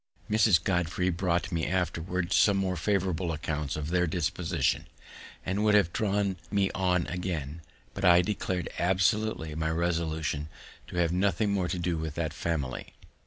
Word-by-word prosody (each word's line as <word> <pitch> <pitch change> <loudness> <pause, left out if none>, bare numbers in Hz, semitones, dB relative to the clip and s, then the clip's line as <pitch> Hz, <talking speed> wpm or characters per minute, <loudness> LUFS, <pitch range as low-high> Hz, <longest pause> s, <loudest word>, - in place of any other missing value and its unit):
Mrs. 105 -6 +4
Godfrey 90 -1 0
brought 90 +1 0
me 85 -2 -1
afterward 90 0 -1
some 100 -2 +5
more 95 -1 0
favorable 90 -2 0
accounts 75 -2 -3
of 75 0 -4
their 90 0 +2
disposition, 85 -1 -1 0.6
and 95 +3 0
would 105 -1 +4
have 95 -5 +3
drawn 100 -2 0
me 100 -1 +1
on 90 -2 +1
again; 85 -4 -4 0.3
but 100 - -6
I 90 -1 +7
declared 90 -2 -2
absolutely 95 -2 +1
my 80 +1 -1
resolution 80 -3 -1 0.4
to - - -9
have 85 -1 +2
nothing 100 +3 +1
more 95 -3 0
to 90 - -2
do 85 -1 -1
with 80 -1 -4
that 80 -3 -2
family. 75 -5 -3
90 Hz, 155 wpm, -29 LUFS, 80-95 Hz, 0.6 s, I